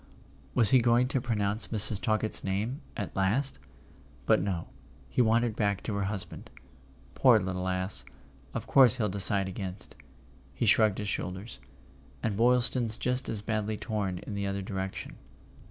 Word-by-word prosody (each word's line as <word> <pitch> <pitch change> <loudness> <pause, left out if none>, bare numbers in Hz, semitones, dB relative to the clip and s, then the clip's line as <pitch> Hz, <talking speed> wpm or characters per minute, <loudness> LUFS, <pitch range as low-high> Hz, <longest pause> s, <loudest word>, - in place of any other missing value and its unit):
Was 115 -4 +5
he 130 - +6
going 120 +1 +3
to 135 -2 -1
pronounce 105 -3 -1
Mrs. 105 -2 +5
Talkett's 110 0 +1
name—at 105 - -4
last? 105 - 0 0.7
But - - +3
no; 90 -3 -3 0.4
he - - +2
wandered 115 -1 +2
back 100 -3 -1
to 110 - -4
her 100 -1 -1
husband. 100 -1 -5 0.6
"Poor 125 - +5
little 90 -2 -3
ass! 95 +1 -3 0.5
Of - - -4
course 130 -4 +5
he'll 105 -4 0
decide 100 0 +3
against." 95 0 -7 0.6
He - - -1
shrugged 110 -1 +4
his 105 - -4
shoulders. 95 +2 -4 0.6
"And 110 -3 -1
Boylston's 120 0 +2
just 125 +1 -2
as 105 -2 -4
badly 110 -1 -2
torn 100 -6 -3
in 105 - -8
the 100 0 -3
other 100 0 -3
direc¬ 95 0 -4
tion." - - -8
105 Hz, 155 wpm, -29 LUFS, 95-115 Hz, 0.7 s, he